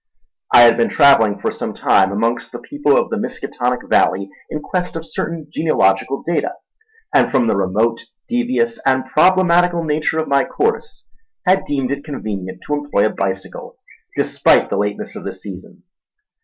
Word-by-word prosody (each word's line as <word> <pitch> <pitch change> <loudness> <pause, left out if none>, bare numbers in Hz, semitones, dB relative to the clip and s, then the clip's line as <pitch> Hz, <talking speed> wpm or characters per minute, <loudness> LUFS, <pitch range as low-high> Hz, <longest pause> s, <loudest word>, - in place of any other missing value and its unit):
I 120 - +8
had 115 -1 +6
been 115 - +2
travelling 115 -8 +4
for - - -2
some - - -6
time 95 -1 +3
amongst 115 +4 -1
the - - -6
people 290 - 0
of - - 0
the - - -1
Miskatonic 125 0 -3
Valley 100 +1 +1 0.2
in 155 - -4
quest 180 +3 -3
of 165 0 -5
certain 165 -1 -5
genealogical 135 -4 +1
data; 170 - -2 0.6
and - - +4
from 130 -4 +2
the 110 - +1
remote, 105 +5 0 0.2
devious, 240 -1 0
and 130 -1 +1
problematical 175 +2 +3
nature 155 +1 -1
of 160 - -1
my 140 -1 +3
course, 450 +2 -2 0.4
had 190 +1 +2
deemed 135 -3 -2
it 140 0 -3
convenient 100 -10 -6
to 150 - -2
employ 145 -8 0
a - - +2
bicycle 95 -1 -5 0.4
despite - - +2
the - - 0
lateness 105 0 -3
of - - -8
the - - -4
season. 100 - -11
140 Hz, 165 wpm, -18 LUFS, 105-170 Hz, 0.6 s, I